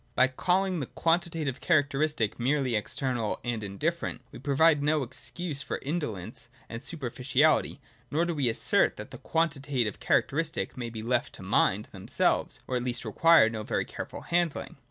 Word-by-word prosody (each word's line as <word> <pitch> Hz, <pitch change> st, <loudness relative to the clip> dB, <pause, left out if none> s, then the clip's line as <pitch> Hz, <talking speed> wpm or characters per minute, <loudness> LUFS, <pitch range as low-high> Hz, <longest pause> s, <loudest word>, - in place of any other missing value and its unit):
By 130 Hz, +1 st, +5 dB
calling 185 Hz, +6 st, +1 dB
the 135 Hz, -, -3 dB
quantitative 165 Hz, -5 st, 0 dB
characteristic 145 Hz, -, +1 dB
merely 130 Hz, -1 st, +1 dB
external 115 Hz, +1 st, -2 dB
and 120 Hz, -3 st, -2 dB
indifferent, 100 Hz, -1 st, -3 dB
we -, -, -10 dB
provide 145 Hz, +3 st, +3 dB
no 150 Hz, 0 st, +2 dB
excuse 140 Hz, +4 st, -5 dB
for -, -, -3 dB
indolence 115 Hz, -, -4 dB, 0.2 s
and 115 Hz, 0 st, -6 dB
superficiality, 140 Hz, 0 st, +1 dB, 0.3 s
nor 160 Hz, +4 st, +1 dB
do 170 Hz, -, -1 dB
we 140 Hz, -6 st, +1 dB
assert 110 Hz, -, +3 dB
that -, -, -9 dB
quantitative 140 Hz, -8 st, 0 dB
characteristics 160 Hz, +3 st, 0 dB
may 120 Hz, -2 st, -4 dB
be 110 Hz, -1 st, -7 dB
left 125 Hz, +2 st, 0 dB
to -, -, -10 dB
mind -, -, +2 dB
themselves, -, -, 0 dB
or 130 Hz, -, -1 dB
at 120 Hz, -, -2 dB
least 125 Hz, -1 st, -2 dB
require 165 Hz, +3 st, +6 dB
no 110 Hz, -1 st, -3 dB
very 105 Hz, -, -1 dB
careful -, -, -7 dB
handling. 170 Hz, -5 st, -1 dB
140 Hz, 155 wpm, -28 LUFS, 120-160 Hz, 0.3 s, require